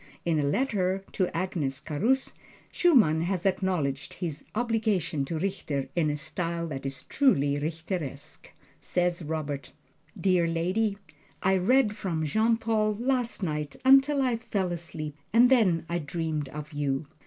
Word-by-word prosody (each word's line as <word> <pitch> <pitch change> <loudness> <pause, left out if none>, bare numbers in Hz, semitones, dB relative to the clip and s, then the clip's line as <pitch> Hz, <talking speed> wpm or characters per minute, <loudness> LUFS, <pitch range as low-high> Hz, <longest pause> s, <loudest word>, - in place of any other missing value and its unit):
In 165 -3 +2
a - - +1
letter 190 - 0
to 185 - +1
Agnes 165 -6 -2
Carus, 225 - 0 0.4
Schumann 230 - +4
has 180 +1 -1
acknowledged 175 -8 0
his 155 -5 -4
obligation 215 - 0
to 160 +4 -3
Richter, 155 -6 -2
in 165 -3 +2
a 150 - -1
style 170 +2 -3
that 135 -2 -4
is 135 -1 -4
truly 145 - +2
Richteresque. 160 -2 -4 0.3
Says 175 -1 0
Robert: 150 -3 -4 0.5
Dear 180 -3 +3
Lady: 185 +6 0 0.5
I 190 +1 +4
read 210 +3 +3
from 165 -6 -2
Jean 220 +8 +2
Paul 220 -2 +1
last 245 -4 0
night 150 -3 -2
until 275 +1 +6
I 250 -3 +1
fell 195 -5 -2
asleep 160 -3 -5 0.2
and 245 +3 +6
then 185 -11 +4
I 170 0 -1
dreamed 155 -1 -3
of 150 +2 -8
you. 145 0 -1
175 Hz, 140 wpm, -28 LUFS, 150-215 Hz, 0.5 s, until